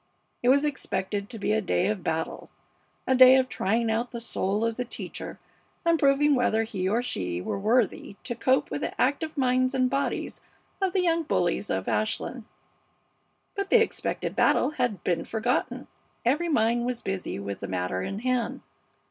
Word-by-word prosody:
It 245 - +2
was 280 +3 +5
expected 205 -7 -3
to 240 - -5
be 210 0 0
a 220 - +2
day 180 -1 +1
of 205 -3 -1
battle; 160 0 -3 0.6
a 260 - +2
day 255 0 +9
of 260 -1 +3
trying 225 0 0
out 230 +2 -1
the 235 - -6
soul 210 -2 -1
of 230 -1 -1
the 250 - -2
teacher 245 - -7 0.5
and 335 -1 +3
proving 285 +1 +4
whether 230 -4 +2
he 190 -4 -2
or 230 +4 +1
she 90 - -3
were 90 - -3
worthy 215 -1 +1
to 250 - -3
cope 260 +2 +1
with - - -3
the - - -4
active 295 +4 0
minds 255 0 +2
and 255 -1 +2
bodies 275 +1 -2 0.4
of 385 -2 +1
the 380 -2 +2
young 335 -1 +2
bullies 315 - 0
of - - -2
Ashland. - - -1 1.1
But 395 -1 -3
the 475 - +6
expected 450 - -2
battle - - +3
had 250 -8 -2
been 170 -2 0
forgotten. 225 +2 -1 0.4
Every 300 +8 +2
mind 235 -3 +2
was 250 -1 -3
busy 190 - -3
with 100 0 -5
the - - -5
matter 90 0 -2
in 195 - -4
hand. 250 -2 -1
240 Hz, 180 wpm, -27 LUFS, 200-265 Hz, 1.1 s, day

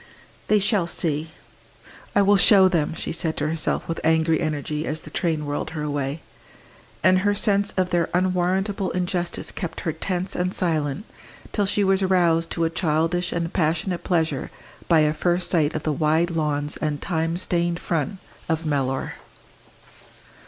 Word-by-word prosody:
"They 215 - +4
shall 200 -3 +1
see 155 -2 -2 0.9
I 205 - +5
will 200 +1 +5
show 195 -1 +7
them!" 165 -4 0
she - - -4
said 160 -1 -2
to - - 0
herself 160 0 -1
with 165 - -3
angry 160 0 +3
energy, 150 -1 -2
as 155 +1 -2
the - - -11
train 160 -4 -1
whirled 145 0 -3
her 150 - -2
away. 145 +1 -2 0.8
And 185 0 +5
her 205 +2 +1
sense 200 0 +2
of 185 -1 +1
their 170 -2 +1
unwarrantable 185 +2 0
injustice 175 -1 -2
kept 170 -4 -5
her 160 - -2
tense 180 +3 -3
and 180 +1 -1
silent 155 0 -1 0.5
till 205 -2 0
she 205 +1 +1
was 195 0 +2
roused 170 -3 +2
to 170 - -1
a 165 - +1
childish 165 +1 0
and 170 0 -2
passionate 170 +1 0
pleasure 160 -6 0 0.4
by 165 -2 +5
a 150 0 +2
first 175 +3 0
sight 160 -3 +2
of 155 - -3
the 155 - 0
wide 160 +4 +1
lawns 150 -2 -1
and 150 -2 -2
time 165 0 -1
stained 175 -1 0
front 170 +4 -2 0.3
of 160 0 -1
Mellor. 135 -3 -1
170 Hz, 165 wpm, -23 LUFS, 155-185 Hz, 0.9 s, show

